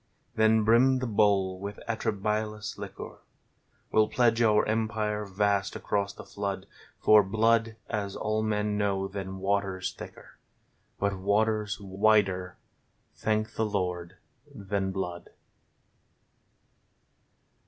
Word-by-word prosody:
Then 110 Hz, 0 st, +4 dB
brim 120 Hz, +4 st, +5 dB
the 130 Hz, -, -2 dB
bowl 100 Hz, -4 st, +2 dB
with 100 Hz, +1 st, -6 dB
atrabilious 110 Hz, -1 st, -2 dB
liquor! -, -, -8 dB, 0.7 s
We'll 110 Hz, 0 st, +4 dB
pledge 120 Hz, -2 st, +2 dB
our 105 Hz, -2 st, +4 dB
Empire 110 Hz, -1 st, -1 dB
vast 100 Hz, 0 st, 0 dB
across 100 Hz, -1 st, -1 dB
the -, -, -11 dB
flood: 100 Hz, -1 st, -4 dB, 0.3 s
For 110 Hz, 0 st, +7 dB
Blood, 115 Hz, +3 st, +2 dB
as 100 Hz, -3 st, -3 dB
all 110 Hz, 0 st, -1 dB
men 105 Hz, -1 st, 0 dB
know, 100 Hz, -1 st, 0 dB
than 95 Hz, -1 st, -6 dB
Water's 95 Hz, -1 st, -1 dB
thicker, -, -, -12 dB, 0.6 s
But 100 Hz, -1 st, -1 dB
water's 105 Hz, +1 st, +1 dB
wider, 95 Hz, -2 st, +1 dB, 0.6 s
thank 110 Hz, 0 st, -1 dB
the 110 Hz, -, -1 dB
Lord, 90 Hz, -3 st, -3 dB, 0.4 s
than 100 Hz, -5 st, -3 dB
Blood. 90 Hz, -2 st, -5 dB
105 Hz, 110 wpm, -28 LUFS, 95-110 Hz, 0.7 s, For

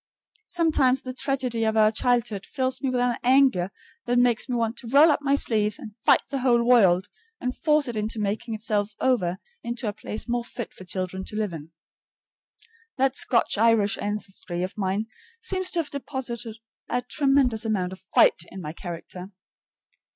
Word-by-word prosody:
Sometimes 290 Hz, -7 st, +2 dB
the 255 Hz, -, -5 dB
tragedy 255 Hz, -3 st, -1 dB
of 220 Hz, 0 st, +1 dB
your 215 Hz, -1 st, +5 dB
childhood 230 Hz, -3 st, 0 dB
fills 260 Hz, -2 st, -2 dB
me 270 Hz, -, 0 dB
with 250 Hz, -1 st, 0 dB
an 245 Hz, -1 st, +1 dB
anger 255 Hz, -8 st, +4 dB, 0.4 s
that 245 Hz, 0 st, +2 dB
makes 245 Hz, 0 st, +2 dB
me 250 Hz, -, 0 dB
want 230 Hz, 0 st, 0 dB
to 240 Hz, -, -7 dB
roll 285 Hz, +6 st, +6 dB
up 295 Hz, -, 0 dB
my 280 Hz, -1 st, +2 dB
sleeves 215 Hz, -6 st, +1 dB
and 235 Hz, -8 st, -10 dB
fight -, -, +5 dB
the 275 Hz, -, -1 dB
whole 240 Hz, -2 st, +3 dB
world 195 Hz, -7 st, +4 dB, 0.3 s
and 250 Hz, 0 st, -3 dB
force 300 Hz, -2 st, +2 dB
it 240 Hz, -, -4 dB
into 215 Hz, +1 st, -3 dB
making 215 Hz, +2 st, -2 dB
itself 210 Hz, -1 st, -1 dB
over 190 Hz, -9 st, +1 dB, 0.2 s
into 235 Hz, 0 st, -4 dB
a 205 Hz, -, -1 dB
place 215 Hz, +1 st, -4 dB
more 240 Hz, 0 st, -1 dB
fit 240 Hz, 0 st, -7 dB
for 185 Hz, -, -12 dB
children 185 Hz, +1 st, -4 dB
to -, -, -8 dB
live 210 Hz, -4 st, -2 dB
in. 155 Hz, -1 st, -8 dB, 1.3 s
That 270 Hz, 0 st, +2 dB
Scotch 230 Hz, -3 st, +2 dB
Irish 225 Hz, -3 st, +3 dB
ancestry 195 Hz, -4 st, -4 dB
of 185 Hz, -, -5 dB
mine 195 Hz, +1 st, -1 dB, 0.3 s
seems 380 Hz, -5 st, -2 dB
to 350 Hz, -, -1 dB
have 300 Hz, -, -10 dB
deposited 250 Hz, -5 st, -5 dB, 0.3 s
a 245 Hz, 0 st, -1 dB
tremendous 265 Hz, -3 st, +2 dB
amount 190 Hz, -5 st, -1 dB
of 190 Hz, -, -11 dB
FIGHT 185 Hz, -, +3 dB
in 195 Hz, -, -8 dB
my 155 Hz, -3 st, -6 dB
character. 175 Hz, +2 st, -8 dB
235 Hz, 180 wpm, -25 LUFS, 205-255 Hz, 1.3 s, roll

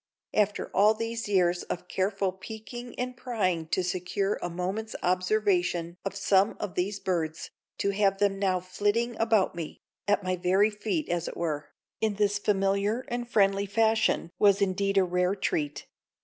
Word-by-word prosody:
After 210 Hz, -1 st, +1 dB
all 210 Hz, +2 st, +6 dB
of -, -, -15 dB
these 230 Hz, 0 st, -3 dB
years 180 Hz, -3 st, +3 dB
of 180 Hz, -, -5 dB
careful 195 Hz, 0 st, 0 dB
peeking 220 Hz, +5 st, -9 dB
and 250 Hz, 0 st, -3 dB
prying 205 Hz, -10 st, -1 dB
to 185 Hz, -, 0 dB
secure 185 Hz, +3 st, -1 dB
a 175 Hz, -, -2 dB
moment's 190 Hz, +6 st, -3 dB
observation 180 Hz, -2 st, +1 dB
of 195 Hz, 0 st, -4 dB
some 200 Hz, 0 st, +3 dB
of 205 Hz, -3 st, -4 dB
these 195 Hz, +3 st, -1 dB
birds, 165 Hz, -4 st, -2 dB, 0.3 s
to 200 Hz, -, +1 dB
have 195 Hz, -1 st, +2 dB
them 195 Hz, -1 st, +1 dB
now 185 Hz, -2 st, +1 dB
flitting 205 Hz, +6 st, 0 dB
about 225 Hz, -4 st, +3 dB
me, 170 Hz, -3 st, -6 dB, 0.3 s
at 205 Hz, 0 st, +2 dB
my 185 Hz, 0 st, 0 dB
very 190 Hz, +4 st, +3 dB
feet 220 Hz, +9 st, -2 dB
as 175 Hz, -1 st, -1 dB
it -, -, -6 dB
were, 155 Hz, -3 st, -2 dB, 0.3 s
in 220 Hz, -2 st, 0 dB
this 205 Hz, 0 st, +1 dB
familiar 200 Hz, +4 st, +1 dB
and 240 Hz, 0 st, -3 dB
friendly 200 Hz, -2 st, +3 dB
fashion 220 Hz, -3 st, +2 dB
was 200 Hz, -1 st, +5 dB
indeed 195 Hz, 0 st, +1 dB
a 195 Hz, -, +6 dB
rare 180 Hz, +1 st, +1 dB
treat. 150 Hz, -7 st, -2 dB
195 Hz, 165 wpm, -28 LUFS, 180-215 Hz, 0.3 s, all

